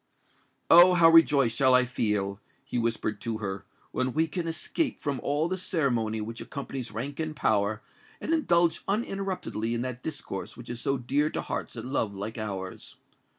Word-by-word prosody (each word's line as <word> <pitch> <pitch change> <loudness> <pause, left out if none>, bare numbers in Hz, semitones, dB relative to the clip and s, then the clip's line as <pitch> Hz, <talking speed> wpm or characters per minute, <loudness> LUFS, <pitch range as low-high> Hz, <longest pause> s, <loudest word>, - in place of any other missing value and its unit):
"Oh! 175 +2 +9
how 165 -1 +7
rejoiced 140 -8 +5
shall 130 -2 +5
I 125 0 +5
feel," 105 -5 -1 0.3
he 125 - -2
whispered 115 -2 -2
to 115 -2 -2
her, 100 -2 -5 0.3
"when 130 -1 -1
we 160 +2 +2
can 165 +1 -4
escape 215 - -1
from 140 -3 -2
all 145 +3 0
the 185 +2 -2
ceremony 120 -12 0
which 115 +2 -6
accompanies 135 0 -6
rank 130 +7 -5
and 155 -1 -3
power, 105 -3 +1 0.4
and 325 - -1
indulge 170 - +3
uninterruptedly 195 - -2
in 120 - -2
that 125 -1 -5
discourse 145 -11 -5
which 120 0 -8
is 120 0 -4
so 135 +1 0
dear 140 +5 0
to - - -3
hearts - - -4
that - - -6
love 115 -6 -1
like 105 +4 -5
ours! 95 -3 -6
130 Hz, 175 wpm, -28 LUFS, 110-160 Hz, 0.4 s, Oh